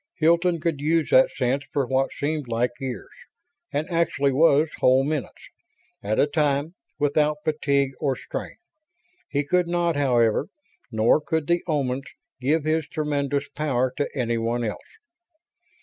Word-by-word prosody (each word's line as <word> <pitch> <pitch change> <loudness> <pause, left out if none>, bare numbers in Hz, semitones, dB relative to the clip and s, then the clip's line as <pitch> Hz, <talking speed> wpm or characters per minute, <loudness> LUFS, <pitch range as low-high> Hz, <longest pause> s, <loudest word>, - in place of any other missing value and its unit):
Hilton 170 +2 +3
could 165 -3 -1
use 160 +1 +1
that 130 - +6
sense 130 +2 -1
for 140 -2 0
what 135 +1 0
seemed 150 -1 -3
like 120 +1 0
years 130 -2 -6 0.6
and 150 +2 -2
actually 165 -4 +1
was 150 +1 +4
whole 130 +1 +4
minutes 145 -3 -4 0.5
at 105 +2 -1
a - - +5
time 150 +1 0 0.2
without 150 +1 +1
fatigue 140 -3 +1
or 135 -3 0
strain. - - -6 0.7
He 145 0 -1
could 180 +3 +1
not, 170 -1 0
however, 125 -2 +2 0.4
nor 110 +6 +3
could 160 -1 -1
the 170 +2 +1
Omans, 135 -4 -1 0.3
give 145 +5 +1
his 155 0 0
tremendous 145 -2 -1
power 130 -4 -1
to 145 - -1
anyone 120 -1 -1
else. 110 -3 -3
145 Hz, 140 wpm, -24 LUFS, 130-155 Hz, 0.7 s, that